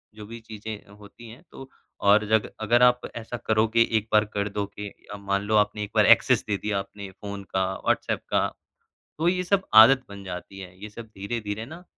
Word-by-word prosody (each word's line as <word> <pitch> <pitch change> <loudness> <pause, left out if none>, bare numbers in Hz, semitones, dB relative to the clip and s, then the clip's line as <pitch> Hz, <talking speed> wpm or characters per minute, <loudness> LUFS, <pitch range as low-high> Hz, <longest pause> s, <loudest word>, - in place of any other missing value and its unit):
जो 105 -1 -10
भी 115 +2 -9
चीज़ें 110 -2 -9
होती 110 +3 -14
हैं 125 +10 -14
तो 135 0 -11 0.4
और 105 +1 +5
जग 110 -1 +2
अगर 120 +3 +3
आप 125 0 +5
ऐसा 115 +1 -6
करोगे 110 +1 +2 0.2
एक 110 +1 -3
बार 105 0 +4
कर 100 0 -1
दोगे 100 0 -5 0.3
अ, 105 - -6
मान 100 0 -1
लो 110 +1 -1
आपने 105 0 +1
एक 105 - -7
बार - - +5
एक्सेस - - +5
दे 100 -1 0
दिया 105 -1 -2
अपने 100 0 -8
फ़ोन 100 +1 -8
का, 95 0 -1 0.2
व्हाट्सऐप - - 0
का, - - +2 0.7
तो 165 - +2
ये 180 0 +1
सब 195 +1 +1
आदत 125 +5 +8
बन 100 -1 -10
जाती 95 +1 -8
है। 90 -1 -11
ये 105 - -6
सब 115 +2 -10
धीरे-धीरे 105 +1 -4
ना 170 +6 -11
105 Hz, 205 wpm, -25 LUFS, 100-115 Hz, 0.7 s, आदत